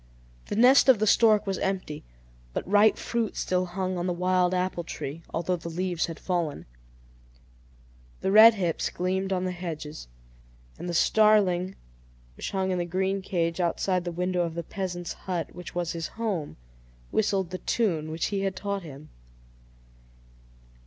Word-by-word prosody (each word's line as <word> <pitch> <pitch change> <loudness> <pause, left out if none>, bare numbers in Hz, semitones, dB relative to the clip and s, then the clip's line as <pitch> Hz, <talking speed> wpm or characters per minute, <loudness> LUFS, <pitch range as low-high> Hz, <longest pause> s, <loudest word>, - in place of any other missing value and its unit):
The - - -3
nest 255 +5 +6
of 255 - +7
the 215 - +1
stork 215 0 +4
was 195 -2 -2
empty, 185 -6 -3 0.5
but - - -3
ripe 205 +2 +5
fruit 235 -2 -2
still 185 0 0
hung 185 0 -3
on 175 - -2
the 180 - 0
wild 180 0 +2
apple 180 -1 -1
tree, 160 -1 -6
although 175 +2 -1
the 170 0 -7
leaves 175 0 -1
had 165 -1 -7
fallen. 170 -5 -2 1.6
The 190 - 0
red 220 +2 +9
hips 175 -5 -1
gleamed 190 +2 -2
on 185 -1 0
the 185 - -1
hedges, 160 - -6 0.7
and 175 - -5
the 170 - -2
starling 195 -3 +3 0.6
which - - -5
hung 190 -1 -1
in 180 - 0
the - - 0
green 190 +2 -1
cage 170 -2 -1
outside 180 +1 0
the 175 - -3
window 180 +1 -1
of 165 -2 -2
the 170 - -3
peasant's 175 -2 -4
hut, 175 -3 -4
which 180 0 -9
was 175 -1 -1
his 165 -2 -4
home, 200 -10 -3 0.5
whistled 195 -4 0
the 185 - -4
tune 165 -10 0
which 160 +1 -2
he 200 - 0
had 195 -1 -1
taught 200 +1 -3
him. 155 -2 -11
185 Hz, 165 wpm, -27 LUFS, 170-195 Hz, 1.6 s, red